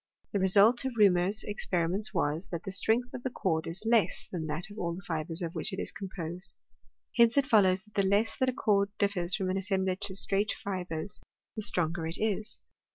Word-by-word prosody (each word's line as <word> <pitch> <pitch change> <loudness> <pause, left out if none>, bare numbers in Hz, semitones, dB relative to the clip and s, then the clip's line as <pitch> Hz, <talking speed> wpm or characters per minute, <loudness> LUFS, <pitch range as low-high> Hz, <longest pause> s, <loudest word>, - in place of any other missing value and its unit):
The 200 - 0
result 200 +6 +5
of 265 -1 -2
Reaumur's 195 0 +4
experiments 190 0 0
was, 155 +5 -1
that 170 -1 -5
the 195 - -5
strength 225 +5 +2
of - - -6
the 260 - -2
cord 165 -9 -1
is 185 +6 -6
less 225 -2 +2
than 165 -4 -3
that 160 +7 -4
of 210 - -9
all 170 -1 -2
the 190 - -9
fibres 165 0 -3
of 165 0 -4
which - - -2
it 190 - -5
is - - -2
com 195 -2 -7
posed. 175 +2 -5 0.6
Hence 235 +2 +5
it 280 - +4
follows, 195 -6 +4
that 210 -1 -24
the 200 - +2
less 210 +3 +2
that 260 - +2
a - - -1
cord 200 -4 +2
ditfers 185 -3 +1
from 190 -2 -1
an 190 - -1
assemblage 190 0 0
of 190 - -8
straight 200 +2 +1
fibres, 185 -2 -5 0.3
the 215 - -3
stronger 170 -4 0
it 165 - -2
is. 215 0 -2
195 Hz, 215 wpm, -30 LUFS, 175-215 Hz, 0.6 s, result